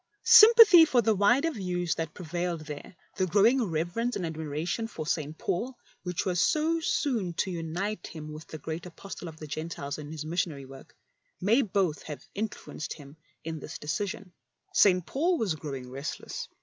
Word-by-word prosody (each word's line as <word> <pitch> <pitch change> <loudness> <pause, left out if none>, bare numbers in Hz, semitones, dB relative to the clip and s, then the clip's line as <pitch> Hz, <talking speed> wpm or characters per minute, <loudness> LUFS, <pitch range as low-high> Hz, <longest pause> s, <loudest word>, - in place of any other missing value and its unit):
Sympathy 440 -6 +9
for 255 -7 +3
the 220 0 +3
wider 240 - +3
views 180 - -2
that 160 -2 -5
pre 180 - -8
vailed 175 0 -2
there, 150 +3 -9 0.2
the 185 -2 +1
growing 220 +8 +4
reverence 175 +7 -1
and 180 - -2
admir 155 -2 -5
ation 185 +8 -2
for 160 -8 -6
St. 155 -1 -2
Paul, 240 +8 -3 0.2
which 180 -2 -3
was 180 -2 +1
so 320 +2 +2
soon 240 - -1
to 190 - -1
unite 175 +5 -3
him 155 -1 -8
with 155 +1 -10
the 155 - -7
great 160 +3 -6
Apostle 180 +1 -9
of 160 -1 -9
the 155 - -8
Gentiles 150 -1 -5
in 150 0 -8
his 155 -1 -6
missionary 160 -4 -2
work, 135 0 -14 0.4
may 220 +8 +3
both 190 - 0
have 150 - -8
influenced 210 -6 -5
him 145 -1 -13 0.3
in 160 -2 -5
his - - -7
decision. 190 +4 -4 0.4
St. 180 -3 +4
Paul 335 - +1
was 210 - 0
growdng 135 -5 -7
restless. 135 +3 -5
175 Hz, 175 wpm, -28 LUFS, 155-215 Hz, 0.4 s, Sympathy